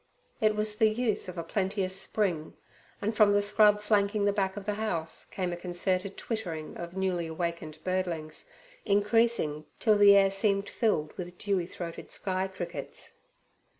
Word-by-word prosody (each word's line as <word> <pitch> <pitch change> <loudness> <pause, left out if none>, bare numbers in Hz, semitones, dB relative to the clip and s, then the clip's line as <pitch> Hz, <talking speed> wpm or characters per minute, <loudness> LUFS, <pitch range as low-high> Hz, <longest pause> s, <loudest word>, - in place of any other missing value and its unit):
It 215 -1 +3
was 210 0 0
the 220 - +6
youth 215 -3 -1
of 180 - -8
a 170 - -2
plenteous 190 +1 -1
spring, 190 -5 -1 0.5
and 215 +2 -1
from 210 -1 +5
the 205 - +4
scrub 210 0 +4
flanking 205 0 +2
the 205 - +3
back 195 -1 -1
of 200 - -6
the 210 - 0
house 190 -7 -3
came 180 -2 -3
a - - -2
concerted 185 +2 -2
twittering 175 -9 -4
of 170 +2 -7
newly 180 -3 0
awakened 160 -1 -4
birdlings, 180 - -3 0.3
increasing 205 -7 +2
till 215 -2 +3
the 200 -1 +8
air 195 -1 +5
seemed 200 0 +1
filled 155 -10 0
with 175 0 -6
dewy 195 -4 -1
throated 170 -2 -7
sky 190 -1 -2
crickets. 190 -1 -7
195 Hz, 160 wpm, -29 LUFS, 175-210 Hz, 0.5 s, the